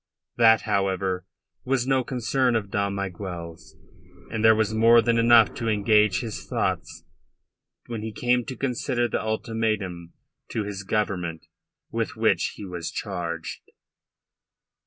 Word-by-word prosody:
That, 115 -1 +6
however, 95 -3 -1 0.4
was 130 -1 0
no 130 -1 +2
concern 125 0 0
of 100 -3 -2
Dom 100 -1 0
Miguel's, 90 -2 -6 0.6
and 110 0 -2
there 110 0 +7
was 110 0 0
more 115 +2 +6
than 115 0 +2
enough 115 -1 +6
to 115 - -4
engage 105 -2 +3
his 110 -3 -6
thoughts - - -2 0.8
when 115 -2 -5
he 110 +1 -4
came 125 +2 +1
to 130 - -6
consider 125 -1 -1
the - - -2
ultimatum 110 -6 -2 0.4
to 110 - -2
his 100 -1 -5
Government 95 -5 -2 0.5
with - - -2
which - - +1
he 105 - -8
was 90 -3 -5
charged. 85 -2 -5
110 Hz, 135 wpm, -25 LUFS, 95-115 Hz, 0.8 s, there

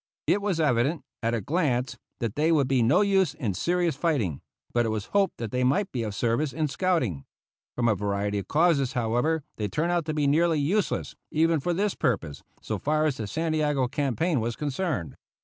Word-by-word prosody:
It 205 - +2
was 200 -5 -1
evident, 140 +1 +1 0.2
at 115 0 0
a 115 - -2
glance, 135 - 0 0.3
that 115 -3 -1
they 155 +3 +2
would 145 -5 +3
be 130 -2 +2
no 120 - +4
use 195 -6 +2
in 120 -10 -2
serious 170 - 0
fighting, 135 - 0 0.3
but 120 - +3
it 115 - -1
was 110 -2 -2
hoped 200 -1 +2
that 115 -3 -5
they 125 0 0
might 145 +10 +1
be 125 - -2
of 105 -3 -4
service 125 +6 0
in 155 -1 0
scouting. 135 - 0 0.5
From 120 -1 +1
a 110 - +4
variety 100 0 -1
of 100 - -7
causes, 150 -5 +2
however, 125 +6 0
they 105 - -1
turned 155 - -1
out 175 -3 0
to 155 - -2
be 150 -1 +1
nearly 160 +2 +3
useless, 185 +8 0
even 165 +1 +2
for 175 +6 -1
this 205 +2 +1
purpose, 80 - -1 0.2
so - - -3
far 155 +1 +1
as 150 -4 0
the 110 - -4
Santiago 150 -1 0
campaign 145 +3 0
was 115 +1 -2
concerned. 145 - -3
145 Hz, 200 wpm, -26 LUFS, 115-165 Hz, 0.5 s, no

